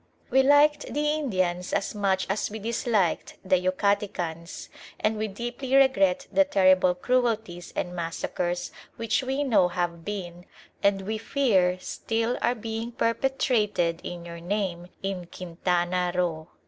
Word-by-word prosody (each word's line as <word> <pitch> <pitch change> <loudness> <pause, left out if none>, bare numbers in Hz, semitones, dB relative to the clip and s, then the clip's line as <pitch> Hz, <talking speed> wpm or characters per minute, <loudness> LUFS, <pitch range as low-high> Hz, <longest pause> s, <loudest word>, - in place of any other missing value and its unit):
We 265 - +6
liked 290 +2 +4
the 295 +1 0
Indians 185 -12 -1
as 195 - 0
much 195 -2 +1
as 195 +2 -1
we 215 - -6
disliked 220 -4 0
the 185 -1 +3
Yucatecans, 185 -3 -1 0.3
and 215 +1 +1
we 215 0 -2
deeply 240 +5 -3
regret 260 -10 +4
the 290 - +5
terrible 185 -8 +4
cruelties 220 -5 -1
and 180 0 -3
massacres 175 +1 -3 0.2
which 230 +3 0
we 265 +2 -1
know 210 -10 +4
have 175 -1 -3
been 180 -3 -6 0.3
and 195 -1 +2
we 215 +2 -3
fear 205 -8 +2
still 225 +5 -2
are 245 - +2
being 225 +1 -5
perpetrated 230 -8 +1
in 175 -1 -6
your 170 0 -8
name 175 -1 -2 0.2
in 190 -3 -3
Quintana 180 0 -1
Roo. 165 -3 -1
195 Hz, 135 wpm, -26 LUFS, 180-230 Hz, 0.3 s, We